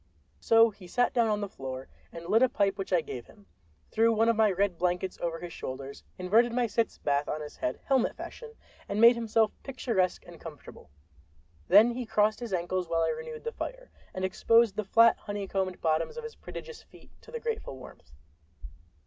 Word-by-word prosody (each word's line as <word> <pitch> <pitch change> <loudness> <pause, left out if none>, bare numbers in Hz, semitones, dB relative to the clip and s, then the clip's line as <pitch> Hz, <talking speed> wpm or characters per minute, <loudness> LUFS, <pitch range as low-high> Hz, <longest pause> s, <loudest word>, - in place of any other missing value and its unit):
So 225 - +5
he 195 -3 -14
sat 245 +7 +1
down 235 -2 +3
on 210 -1 0
the 205 - -2
floor, 130 -6 -7 0.2
and 165 0 -9
lit 215 +6 +3
a 260 - +5
pipe 200 -3 +1
which 195 - -4
I 180 -2 +4
gave 125 -6 -8
him, 100 - -19 0.5
threw 230 +1 +3
one 225 +1 +3
of 230 - +3
my 215 -1 +4
red 190 -2 0
blankets 180 +1 -1
over 165 -1 -2
his 175 -1 -8
shoulders, 135 +1 -7
inverted 220 +7 +3
my 245 0 +2
sitz 230 +1 -1
bath 145 0 0
on 155 - -2
his 150 - -9
head, 315 - -3
helmet 265 -3 +1
fashion, 460 -2 -9 0.4
and 200 - -1
made 235 +2 +9
himself 225 -2 +1
picturesque 230 -9 -1
and 175 -1 -13
comfortable. 150 -5 -11 0.8
Then 230 +3 +7
he 240 -1 -5
crossed 215 0 +2
his 240 -3 -6
ankles, 180 0 -2
while 165 0 +1
I - - +1
renewed 470 -1 -6
the 465 - -3
fire, - - -7 0.2
and 185 0 -3
exposed 230 +3 +3
the 215 -1 -2
flat, 230 +3 +5
honeycombed 195 -2 -3
bottoms 160 - 0
of 470 - -5
his 460 0 -7
prodigious 475 0 -9
feet - - -19
to - - -17
the 475 - -4
grateful 450 - -4
warmth. 130 - -14
205 Hz, 200 wpm, -29 LUFS, 175-235 Hz, 0.8 s, made